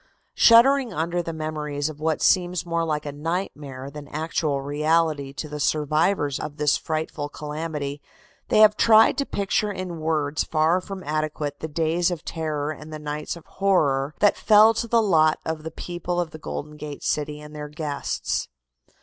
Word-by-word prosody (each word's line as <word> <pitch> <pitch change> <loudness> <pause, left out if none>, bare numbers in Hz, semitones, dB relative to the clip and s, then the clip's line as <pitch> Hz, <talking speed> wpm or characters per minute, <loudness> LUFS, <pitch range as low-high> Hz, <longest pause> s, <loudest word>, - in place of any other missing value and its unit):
Shuddering 250 +2 +6
under 175 +1 -1
the 165 - -5
memories 155 -2 -3
of 155 -2 -7
what 155 0 0
seems 180 -1 +2
more 170 -1 0
like 150 -2 -2
a 145 - -3
nightmare 145 -4 -4
than 145 0 -9
actual 155 -1 -1
reality 150 0 0
to 155 - -5
the 150 0 -6
survivors 150 +1 +1
of 150 0 -6
this 150 -1 +3
frightful 155 -2 -3
calamity, 150 -1 -5 0.5
they 215 - +4
have 210 -1 +7
tried 220 0 +6
to 280 - -1
picture 205 +1 0
in 185 -4 -5
words 155 -2 0
far 160 +3 +2
from 195 -1 -8
adequate 150 -2 -3
the 160 - -4
days 165 +3 +1
of 175 -3 -5
terror 155 -2 -2
and 155 +1 -9
the 155 - -5
nights 150 +1 -4
of 170 - -13
horror 150 -8 +1
that 205 - +5
fell 215 +1 +6
to 235 +1 -2
the 230 0 +3
lot 155 -6 +4
of 160 -1 -3
the 160 - -5
people 175 +2 -4
of 170 -3 -2
the 155 - -10
Golden 150 0 -6
Gate 150 -1 -8
city 150 0 -1
and 150 0 -11
their 150 0 -6
guests. 150 -2 -3
155 Hz, 175 wpm, -24 LUFS, 150-175 Hz, 0.5 s, have